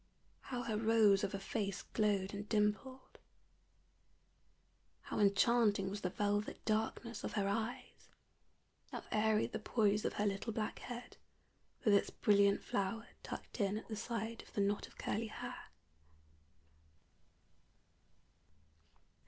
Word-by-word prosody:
how 245 -2 -3
her 220 -3 -1
rose 215 -2 +5
of 200 0 -1
a - - -3
face 195 -1 -2
glowed 205 -3 +1
and 205 0 -6
dimpled! 215 +5 -1 1.8
how - - -4
enchanting 205 -1 +4
was 205 +1 -4
the 180 - 0
velvet 205 +2 -1
darkness 220 +2 -1
of - - -3
her 200 -2 +1
eyes! 220 +4 -3 0.8
how - - -5
airy 215 0 +3
the - - -4
poise 210 -1 +2
of - - 0
her 210 - 0
little 200 +3 -1
black 215 -1 -3
head, 245 0 -7 0.7
with 210 - +6
its 200 - +4
brilliant 200 -1 +3
flower 215 +4 -2
tucked - - -6
in 200 +1 +1
at 220 - -7
the 220 - -3
side 230 +1 -3
of - - -17
the 205 - +1
knot 200 +1 0
of - - -20
curly 225 +2 -1
hair! 245 +3 -7
210 Hz, 130 wpm, -36 LUFS, 200-225 Hz, 1.8 s, with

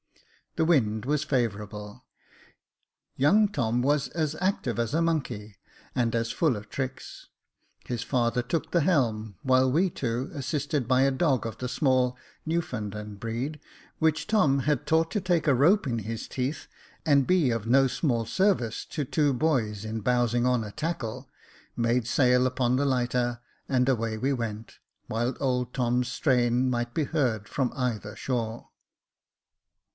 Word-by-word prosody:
The 160 - +2
wind 110 -10 +2
was 150 +2 +1
favourable. 105 -6 -3 1.1
Young 200 +11 +4
Tom 120 - 0
was 140 +2 +1
as 155 -2 -2
active 180 - 0
as 115 +3 -1
a 165 - +2
monkey, 125 -11 -2 0.4
and 120 -2 +1
as 115 0 0
full 150 -9 +1
of 105 +1 -9
tricks. 130 +1 -6 0.6
His 120 -2 -3
father 125 -1 +1
took 125 +6 -3
the 170 - +3
helm, 110 - +1
while 130 0 +3
we 175 +7 +3
two, 125 -1 -2
assisted 145 -1 -2
by 130 0 +4
a 135 - +3
dog 135 -3 +1
of 115 - -6
the 125 - -3
small 130 -1 +1 0.3
Newfoundland 105 -10 -3
breed, 125 +7 -4 0.4
which 160 -1 +1
Tom 150 -11 +3
had 145 -2 0
taught 160 +1 +3
to 210 - -1
take 175 -4 +1
a 140 - +5
rope 160 - +4
in 115 -3 -1
his 110 +1 -5
teeth, 130 +4 -3 0.4
and 140 -3 +4
be 180 -7 +3
of 115 -1 -2
no 135 +3 +5
small 120 -4 0
service 125 - +1
to 150 -3 -4
two 145 +2 +2
boys 120 -8 0
in 110 0 -4
bowsing 120 +1 +1
on 125 -2 +2
a 105 - -7
tackle, 150 -6 -4 0.5
made 115 0 +1
sail 125 0 +3
upon 125 -1 +1
the 140 +2 +1
lighter, 125 -2 0 0.3
and 125 -1 +2
away 115 -4 0
we 135 +5 0
went, 115 -3 -5 0.3
while 120 +3 -1
old 125 -3 -1
Tom's 125 -1 +1
strain 125 0 +2
might 120 -1 -2
be 160 - +1
heard 120 -9 -1
from 130 0 -1
either 115 -6 -3
shore. 115 -3 -3
125 Hz, 155 wpm, -27 LUFS, 115-145 Hz, 1.1 s, a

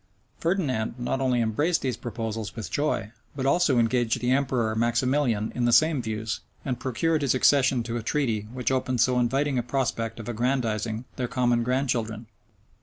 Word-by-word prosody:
Ferdinand 140 - 0
not 125 +2 -2
only 125 -2 +2
embraced 145 +10 0
these 130 -3 0
proposals 115 -2 -5
with 110 -8 -6
joy, 145 -8 -1 0.2
but 135 -2 -3
also 140 -1 +3
engaged 120 0 +2
the 125 +1 0
emperor 130 -5 +1
Maximilian 120 -1 +1
in 125 - 0
the 120 - +3
same 155 +1 +4
views, 110 -1 -3 0.3
and 125 -3 -2
procured 155 +5 0
his 135 -2 +2
accession 130 -2 +4
to 115 +1 -3
a - - -3
treaty 115 -4 -1
which 125 0 -2
opened 130 -1 0
so 125 +1 +3
inviting 135 +2 +1
a - - +1
prospect 120 -2 -2
of 110 - -7
aggrandizing 115 -2 -1
their 125 - -1
common 120 -1 +1
grandchildren. 120 -3 -1
125 Hz, 170 wpm, -26 LUFS, 115-135 Hz, 0.3 s, same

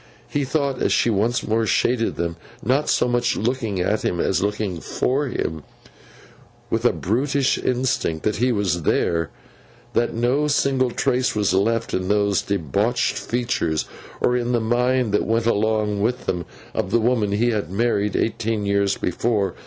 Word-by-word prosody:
He 145 -1 -1
thought, 140 -1 -1
as - - +2
she 120 - +3
once 110 +4 0
more 110 0 +1
shaded 120 +1 +1
them—not 85 - -2
so - - +2
much 120 0 +1
looking 115 -4 -1
at 105 +4 0
him, 85 - -1
as 95 - +1
looking 100 -3 -2
for 140 +3 0
him 80 -10 -3 1.1
with - - 0
a - - +6
brutish 135 +6 0
instinct 125 -10 -1
that 105 - 0
he 125 +3 +2
was 95 -6 0
there—that 115 - -2
no 125 +6 +1
single 135 -3 +2
trace 125 0 0
was 105 -3 +1
left 115 +4 +1
in 95 0 -1
those 100 -1 +2
debauched 100 - 0
features, 115 -10 -1 0.4
or 125 - +2
in 120 0 0
the 120 - +3
mind 120 +1 +1
that 105 - +1
went 115 0 +1
along 110 -2 +1
with 125 +4 -1
them, 85 -2 -2 0.3
of 90 - -2
the 115 - +3
woman 110 -3 +1
he 120 +4 +2
had 105 -7 -2
married 105 0 0
eighteen 110 -2 -1
years 100 0 +1
before. 100 +2 0
115 Hz, 160 wpm, -22 LUFS, 100-125 Hz, 1.1 s, a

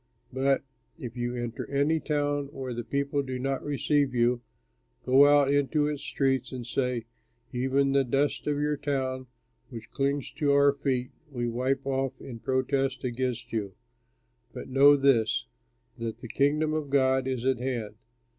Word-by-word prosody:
But 135 +1 +1 0.3
if 125 -7 -7
you 120 0 -2
enter 120 -1 -5
any 145 +3 +2
town 145 -2 -1
where 135 -2 -6
the 120 0 -4
people 140 +3 -1
do 130 -2 -4
not 135 +1 -2
receive 145 -2 +1
you, 120 0 +2 0.6
go 135 +3 +6
out 145 -1 +4
into 145 +1 +2
its 150 -1 -2
streets 135 -3 0
and 125 -2 -6
say, 125 -1 -1 0.5
'Even 135 +2 +1
the 140 0 +3
dust 135 +4 0
of 145 -1 +1
your 150 0 0
town 130 -2 -2 0.4
which 115 -3 -10
clings 140 -1 -1
to 145 -2 +2
our 140 0 +5
feet, 130 -3 -2 0.2
we 120 -4 -3
wipe 130 +4 -1
off 135 -1 -1
in 120 -3 -9
protest 130 +1 0
against 125 -1 -3
you.' 100 -4 -3 0.8
But - - -8
know 140 +2 +7
this: 130 -4 +2 0.5
that 115 -1 -4
the - - -9
Kingdom 150 +5 +1
of 155 -2 -2
God 130 -1 +2
is 130 -2 -2
at 130 -2 +2
hand. 120 -5 -3
135 Hz, 160 wpm, -28 LUFS, 125-140 Hz, 0.8 s, know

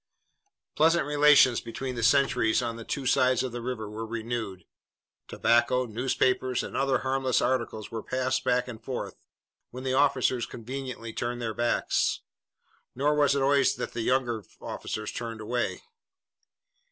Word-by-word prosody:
Pleasant 160 0 +3
relations 145 -4 +5
between 130 +3 -5
the 120 - -4
sentries 125 -2 +3
on 115 -1 -3
the 115 - -8
two 135 +3 -4
sides 130 0 +3
of 130 - -3
the 120 0 -5
river 115 -3 -4
were 105 +2 -6
renewed. 110 -4 -4 0.6
Tobacco, 120 +2 +2
newspapers, 125 +2 0
and - - -7
other 135 -1 +2
harmless 130 -1 +1
articles 115 -4 -1
were 115 -1 -4
passed 130 +2 -1
back 125 0 +1
and 115 -3 -9
forth, - - -5 0.5
when 125 +1 -8
the 130 -1 -1
officers 130 -3 +2
conveniently 125 -1 -6
turned 120 0 -3
their 115 -2 -3
backs. 120 +1 0 0.7
Nor 145 +4 +2
was 145 -1 +3
it 140 - +1
always 140 0 +3
that - - -5
the 115 - -3
younger 120 -2 0 0.2
officers 110 0 -5
turned 115 -2 -5
away. 120 +3 -2
125 Hz, 150 wpm, -27 LUFS, 115-135 Hz, 0.7 s, relations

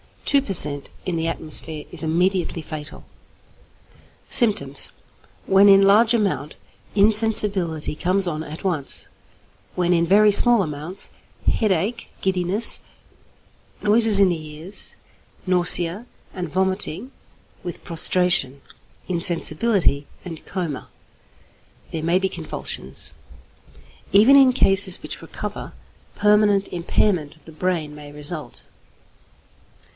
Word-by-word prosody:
Two 280 -1 +3
per 210 -8 -5
cent. 145 -5 +4 0.2
in 180 -2 -3
the 165 0 -2
atmosphere 155 -1 -1
is 175 - -6
immediately 175 +1 -1
fatal. 155 -1 -9 1.3
Symptoms. 145 - +2 0.6
When 195 +1 +4
in 195 -1 +6
large 215 +4 +4
amount, 200 -9 -2 0.4
insensibility 205 -7 +3
comes 185 +4 0
on 155 -2 -4
at 155 0 -10
once; 160 -8 -3 0.7
when 180 0 0
in 170 -1 0
very 210 +3 +4
small 235 +1 +5
amounts, 155 +4 -2 0.3
headache, 215 +3 -1
giddiness, 190 +3 +2 1.0
noises 215 -1 +4
in 195 - +4
the 170 -3 -3
ears, 170 +7 -6 0.5
nausea, 180 +2 +3 0.3
and 180 -3 -6
vomiting, 190 - -3 0.5
with 175 -2 -9
prostration, 165 -5 +1 0.5
insensibility, 170 -2 +1 0.2
and 165 -4 -10
coma. 175 -7 -6 1.0
There 160 - -5
may 170 +3 +1
be 190 0 -1
convulsions. - - -6 1.0
Even 225 +8 +6
in 265 -2 +5
cases 195 -6 +3
which - - -8
recover, - - -8 0.4
permanent 210 -1 +2
impairment 170 -2 -1
of 155 - -27
the 160 - -13
brain 160 -2 -3
may 150 -1 -12
result. 150 -2 -7
180 Hz, 110 wpm, -21 LUFS, 160-200 Hz, 1.3 s, in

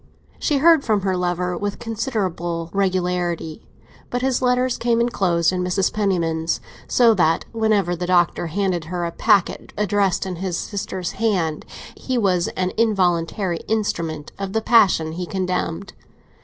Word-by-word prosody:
She 295 - +1
heard 320 0 +5
from 215 -3 +1
her 190 -1 0
lover 180 0 -1
with 205 +2 -3
considerable 190 -8 -3
regularity, 180 -4 -1 0.5
but 245 0 -2
his 265 -1 +1
letters 250 0 +1
came 235 -1 +1
enclosed 185 -8 +2
in 180 0 -1
Mrs. 180 +1 0
Penniman's; 170 -6 0 0.3
so 235 -2 +5
that 165 -5 +2
whenever 215 -6 +1
the 175 +1 -4
Doctor 175 -1 +2
handed 180 -1 -1
her 175 +1 -3
a 170 - -3
packet 205 0 +1
addressed 200 -2 +1
in 185 -2 -4
his 180 -1 -2
sister's 190 -3 -4
hand, 185 -8 -1 0.3
he 260 -1 -3
was 185 -6 +2
an 185 0 0
involuntary 180 -4 +1
instrument 165 -8 -2
of 195 -1 -4
the 220 - +1
passion 190 -9 +4
he 175 +2 -5
condemned. 185 0 -3
185 Hz, 145 wpm, -21 LUFS, 175-215 Hz, 0.5 s, heard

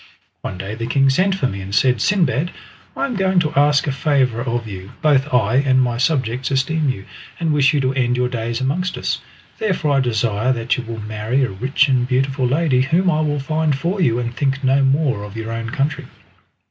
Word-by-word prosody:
One 95 - -5
day 95 +3 -5
the 115 +1 -4
king 135 +2 +3
sent 190 +7 +2
for 165 - -1
me 100 -6 -3
and 95 +1 -5
said, 125 0 +3
"Sindbad, 170 - +1 0.5
I - - 0
am 270 - -3
going 190 -2 +2
to 155 -2 -2
ask 145 0 +3
a 140 - 0
favour 130 -4 +1
of 120 -2 -2
you. 95 -2 -9
Both 145 -1 +2
I 125 -1 +2
and 135 -1 +3
my 120 -2 +1
subjects 130 -3 0
esteem 140 +3 0
you, 100 -6 -4 0.3
and 165 -2 0
wish 145 -1 +4
you 150 - +1
to 130 0 0
end 125 -2 0
your 125 0 +1
days 120 -1 -3
amongst 165 +8 -1
us. - - -2 0.4
Therefore 185 -8 0
I - - +3
desire 115 -1 0
that 120 0 -1
you 125 - -4
will 115 0 -6
marry 110 +5 -1
a 125 - -1
rich 130 +9 +1
and 125 -2 +1
beautiful 130 0 0
lady 135 -1 +2
whom 170 +7 +2
I 155 - +1
will 150 -1 0
find 155 0 0
for 180 +6 -2
you, 120 -8 +2
and 120 -1 -3
think 140 0 -1
no 135 +1 +3
more 135 -5 +1
of 105 +1 -9
your 115 0 -5
own 115 0 -4
country." 145 +2 -2
130 Hz, 220 wpm, -19 LUFS, 120-150 Hz, 0.5 s, wish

